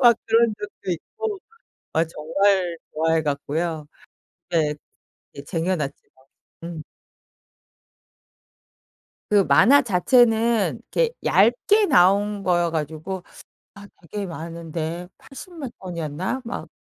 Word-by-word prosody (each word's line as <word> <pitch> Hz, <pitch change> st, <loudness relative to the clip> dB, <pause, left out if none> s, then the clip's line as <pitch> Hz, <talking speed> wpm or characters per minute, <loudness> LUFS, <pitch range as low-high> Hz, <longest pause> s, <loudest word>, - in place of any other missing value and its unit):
막 240 Hz, -3 st, +7 dB
그런 225 Hz, 0 st, +3 dB
적도 205 Hz, -2 st, -7 dB
있고. 430 Hz, -, -5 dB, 0.6 s
아 160 Hz, -, +3 dB
정말 175 Hz, +3 st, +1 dB, 0.2 s
좋아해 160 Hz, +1 st, +2 dB
갖고요. 155 Hz, +2 st, -2 dB, 0.6 s
네. 155 Hz, -3 st, +1 dB, 0.6 s
예 140 Hz, -, -8 dB
쟁여 165 Hz, +5 st, -1 dB
놨죠. 140 Hz, -3 st, -2 dB, 0.7 s
음. 170 Hz, -2 st, -6 dB, 2.5 s
그 205 Hz, -1 st, +5 dB
만화 220 Hz, -, +6 dB
자체는 225 Hz, +2 st, +3 dB
이렇게 -, -, +2 dB
얇게 245 Hz, -, +4 dB
나온 205 Hz, -, +3 dB
거여 175 Hz, -2 st, +2 dB
가지고 160 Hz, +4 st, -4 dB, 0.5 s
아 200 Hz, 0 st, -12 dB, 0.2 s
되게 205 Hz, -1 st, -3 dB
많은데 165 Hz, 0 st, -5 dB
80 315 Hz, +7 st, -12 dB
몇 275 Hz, -6 st, -5 dB
권이었나? 175 Hz, -, -4 dB
막 230 Hz, -, -6 dB
180 Hz, 190 characters per minute, -23 LUFS, 160-225 Hz, 2.5 s, 막